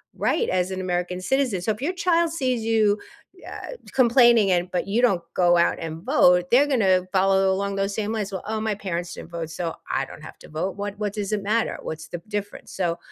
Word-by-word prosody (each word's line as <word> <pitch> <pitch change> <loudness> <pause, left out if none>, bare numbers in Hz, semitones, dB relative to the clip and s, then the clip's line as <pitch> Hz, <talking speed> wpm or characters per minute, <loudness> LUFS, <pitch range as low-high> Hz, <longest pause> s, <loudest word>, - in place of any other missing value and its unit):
right 465 - 0
as 180 +1 0
an 185 0 -3
American 180 0 -2
citizen. 255 -3 0
So, 220 - 0
if 215 +3 -5
your 345 +6 -1
child 340 -2 +2
sees 255 -7 -1
you, 215 -2 +2 0.5
uh, - - -7 0.2
complaining 235 -4 +5
and 175 0 +1
but 180 - -1
you 210 +4 0
don't 195 -8 +3
go 175 -1 +4
out 170 - +2
and 165 0 -6
vote, 180 -9 +4
they're 260 +4 +6
gonna 195 -9 +3
follow 190 0 +3
along 200 +1 -2
those 195 0 -1
same 215 0 -2
lines, 210 -3 -3
"Well, 190 - -4
oh, 220 0 -2
my 215 0 -1
parents 175 -3 -4
didn't - - -9
vote, 165 -2 -5
so 165 0 -4 0.2
I - - 0
don't - - -12
have - - -11
to - - -14
vote. 165 +5 -3
What 205 0 -4
what 205 -2 -2
does 205 -1 -3
it 205 -2 -1
matter? 220 +3 0
What's 155 0 -6
the 175 - -7
difference?" 205 -1 -5
So, 175 -3 -1
200 Hz, 225 wpm, -24 LUFS, 180-225 Hz, 0.5 s, they're